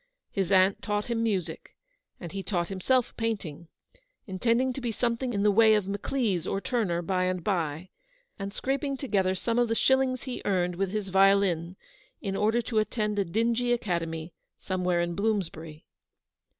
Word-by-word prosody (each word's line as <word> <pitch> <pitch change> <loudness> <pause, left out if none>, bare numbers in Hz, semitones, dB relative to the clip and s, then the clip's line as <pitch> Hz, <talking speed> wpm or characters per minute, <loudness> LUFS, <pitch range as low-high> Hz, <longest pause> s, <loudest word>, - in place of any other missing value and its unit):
His 195 -2 -1
aunt 190 0 +4
taught 210 +2 -2
him 230 -1 0
music, 185 -8 -2 0.4
and 170 -3 -7
he 195 - -4
taught 175 -3 -2
himself 235 +6 +1
painting, 200 -9 -3 0.6
intending 235 +6 +1
to 270 - -6
be 240 -2 -1
some 235 +1 0
thing 250 +1 -3
in 200 -3 0
the 210 - +5
way 220 +1 +6
of 205 -3 0
Maclise 200 -3 -1
or 195 - -1
Turner 200 -7 -1
by 185 +1 0
and 185 -1 -1
by, 170 -2 -2 0.5
and 195 0 -4
scraping 275 +4 -2
together 195 -8 0
some 230 +5 0
of 240 - +3
the 225 - 0
shillings 265 0 +2
he 255 -2 -5
earned 180 -3 +1
with 195 +1 -1
his 205 -1 -3
violin 190 -3 +3 0.4
in 195 -1 -3
order 220 +4 +2
to 225 -2 0
attend 210 -1 -1
a - - +3
dingy 230 +6 0
academy 165 -6 -2 0.2
somewhere 180 -2 0
in 170 0 -1
Bloomsbury. 165 -6 -2
200 Hz, 170 wpm, -28 LUFS, 180-230 Hz, 0.6 s, way